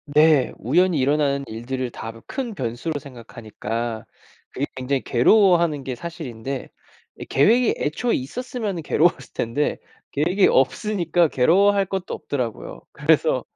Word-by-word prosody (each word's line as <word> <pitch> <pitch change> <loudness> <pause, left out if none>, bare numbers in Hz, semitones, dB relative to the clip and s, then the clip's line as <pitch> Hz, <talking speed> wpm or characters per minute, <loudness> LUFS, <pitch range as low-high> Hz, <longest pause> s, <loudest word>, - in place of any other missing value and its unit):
네. 150 -4 +5
우연히 165 - +2
일어나는 140 0 +1
일들을 125 +3 -4
다 115 - -7 0.2
큰 255 -5 -4
변수로 130 +4 -3
생각하니까 115 -3 -6 0.5
그게 140 - -2
굉장히 130 +1 -1
괴로워하는 170 - +3
게 130 -2 -4
사실인데 135 -5 -6 0.5
예 - - -6
계획이 230 - +3
애초에 195 +11 0
있었으면은 205 - -4
괴로웠을 155 -5 +1
텐데 120 +6 -1 0.3
계획이 175 +7 +2
없으니까 175 +3 +2
괴로워할 195 +9 +3
것도 190 -1 -4
없더라고요. 115 - -5
그래서 - - +2
145 Hz, 330 characters per minute, -22 LUFS, 125-180 Hz, 0.5 s, 네